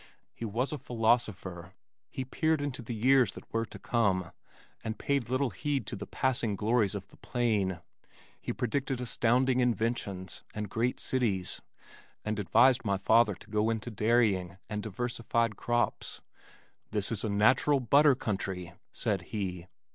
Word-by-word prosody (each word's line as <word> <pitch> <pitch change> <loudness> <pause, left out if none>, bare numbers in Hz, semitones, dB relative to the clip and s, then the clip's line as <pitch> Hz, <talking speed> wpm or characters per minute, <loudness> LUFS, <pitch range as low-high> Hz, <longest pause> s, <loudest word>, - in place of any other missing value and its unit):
He 115 - -6
was 115 +5 -1
a 150 - -4
philosopher. 110 -8 0 0.4
He 130 - -4
peered 160 +4 +1
into 145 -3 -3
the 120 0 -5
years 130 +3 +4
that - - -10
were 115 0 0
to - - -10
come 95 -7 +1 0.5
and 110 0 -3
paid 140 -5 0
little 130 0 +1
heed 140 +8 -2
to - - -5
the - - -7
passing 125 -5 0
glories 105 -1 +1
of 100 -1 -6
the - - -19
plain. 105 -8 0 0.6
He - - -3
predicted 130 +1 -1
astounding 125 +1 +2
inventions 115 -6 -1
and 105 -2 -4
great 120 +2 0
cities, 105 -8 -1 0.6
and 110 -1 -1
advised 125 +6 +4
my 100 -2 +1
father 110 +1 +4
to - - -15
go 105 +1 +2
into 115 +1 -2
dairying 105 -5 +2
and 105 -1 -3
diversified 115 +1 -1
crops. 120 +3 -1 0.7
"This 105 0 -2
is 110 -3 -2
a 110 - -1
natural 125 +8 +4
butter 140 +3 +5
country," 95 -6 -3 0.2
said - - -1
he. 90 -4 -4
115 Hz, 150 wpm, -30 LUFS, 100-125 Hz, 0.7 s, butter